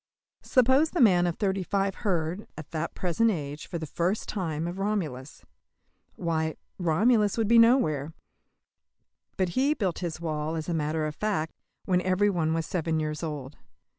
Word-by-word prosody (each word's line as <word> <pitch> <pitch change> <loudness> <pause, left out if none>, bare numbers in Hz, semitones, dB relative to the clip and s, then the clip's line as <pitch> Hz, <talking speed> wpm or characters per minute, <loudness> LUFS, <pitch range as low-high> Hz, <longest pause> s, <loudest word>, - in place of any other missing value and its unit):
Suppose 260 +5 +4
the 350 - -3
man 180 -8 +5
of 170 - -2
thirty 195 -2 0
five 195 +1 0
heard, 180 -1 -1
at 155 - -9
that 160 0 -3
present 190 +6 +1
age, 150 -6 -4
for 170 - -4
the 160 - -4
first 175 +7 -1
time 165 -6 -2
of 175 +2 -5
Romulus. 160 -10 -3 0.7
Why, 160 -2 -1 0.2
Romulus 205 +6 +3
would 225 -2 +1
be 230 +1 +6
nowhere. 165 - +4 1.3
But 185 -2 +1
he 275 - +2
built 190 - -1
his 170 -3 -4
wall, 155 -1 -2
as 160 -1 -4
a 175 - -1
matter 155 0 -1
of 155 - -3
fact, 190 -7 -1 0.3
when 180 -2 +2
every 185 +3 +2
one 160 -3 0
was 165 -1 -1
seven 165 -2 -1
years 155 -1 -3
old. 150 -4 -5
175 Hz, 165 wpm, -27 LUFS, 155-205 Hz, 1.3 s, be